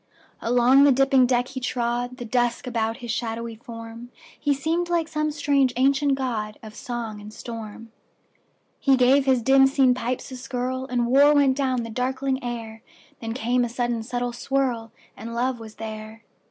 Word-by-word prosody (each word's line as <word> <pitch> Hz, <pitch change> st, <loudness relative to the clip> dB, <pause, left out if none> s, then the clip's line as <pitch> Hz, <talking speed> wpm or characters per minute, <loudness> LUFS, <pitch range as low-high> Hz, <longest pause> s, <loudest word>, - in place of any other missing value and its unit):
Along 245 Hz, +3 st, +5 dB
the 285 Hz, -, +6 dB
dipping 270 Hz, -1 st, +4 dB
deck 245 Hz, 0 st, +1 dB
he 265 Hz, -, -5 dB
trod, 245 Hz, 0 st, -2 dB
The 240 Hz, -, -6 dB
dusk 240 Hz, 0 st, 0 dB
about 225 Hz, -2 st, -1 dB
his 235 Hz, -, -3 dB
shadowy 230 Hz, 0 st, -3 dB
form; 230 Hz, 0 st, -10 dB, 0.3 s
He 290 Hz, -, 0 dB
seemed 325 Hz, +5 st, 0 dB
like 340 Hz, -2 st, +1 dB
some 305 Hz, -1 st, -1 dB
strange 285 Hz, -3 st, +1 dB
ancient 275 Hz, +2 st, +2 dB
godOf 215 Hz, -4 st, -4 dB
song 235 Hz, -4 st, -5 dB
and 210 Hz, +1 st, -10 dB
storm. 225 Hz, 0 st, -8 dB, 0.9 s
He 270 Hz, -2 st, +4 dB
gave 265 Hz, +2 st, +4 dB
his 255 Hz, -3 st, +3 dB
dim 270 Hz, +2 st, +6 dB
seen 270 Hz, -2 st, +4 dB
pipes 250 Hz, +1 st, -4 dB
a -, -, -6 dB
skirlAnd 250 Hz, -1 st, -2 dB
war 280 Hz, +4 st, +5 dB
went 275 Hz, -2 st, +4 dB
down 260 Hz, -3 st, 0 dB
the 230 Hz, -, -7 dB
darkling 260 Hz, +2 st, -2 dB
air; 225 Hz, -2 st, -6 dB, 0.4 s
Then 225 Hz, 0 st, -5 dB
came 245 Hz, 0 st, +1 dB
a 240 Hz, -, -1 dB
sudden 240 Hz, -1 st, -1 dB
subtle 245 Hz, +1 st, -3 dB
swirl, 245 Hz, -3 st, -1 dB, 0.2 s
And 230 Hz, +2 st, -7 dB
love 250 Hz, +1 st, -1 dB
was 220 Hz, -1 st, -10 dB
there. 220 Hz, 0 st, -8 dB
245 Hz, 165 wpm, -24 LUFS, 230-270 Hz, 0.9 s, the